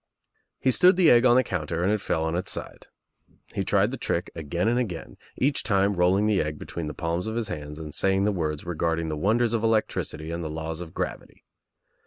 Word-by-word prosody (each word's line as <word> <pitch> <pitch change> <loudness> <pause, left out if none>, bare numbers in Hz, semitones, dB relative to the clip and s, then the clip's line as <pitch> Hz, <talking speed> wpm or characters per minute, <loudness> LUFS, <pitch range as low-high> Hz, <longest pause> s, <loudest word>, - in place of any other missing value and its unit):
He 130 - +2
stood 180 +8 +6
the 180 -3 +5
egg 120 +1 +6
on 120 - +5
the 130 - +5
counter 85 -3 -2
and 95 - +2
it 105 -1 0
fell 80 - -1
on 80 +1 -1
its 90 +2 -2
side. - - -5 0.7
He - - -1
tried - - +2
the - - -4
trick - - -2
again 85 +5 -2
and 120 +2 +2
again, 85 - -4 0.2
each 140 +2 +1
time 100 -1 +2
rolling 95 +3 +3
the 105 -3 +2
egg 75 0 -3
between 80 +1 -6
the 75 - -6
palms 85 +3 -2
of 110 - -3
his 115 -2 -2
hands 75 -3 -6
and 75 -2 -8
saying 95 0 +2
the 105 - +2
words 80 -5 -3
regarding 85 -1 -1
the 75 - -2
wonders 110 +8 +1
of 115 -1 0
electricity 110 -7 -1
and 85 0 -4
the 80 - -4
laws 80 +1 -5
of 80 -2 -9
gravity. - - -5
90 Hz, 225 wpm, -26 LUFS, 80-110 Hz, 0.7 s, stood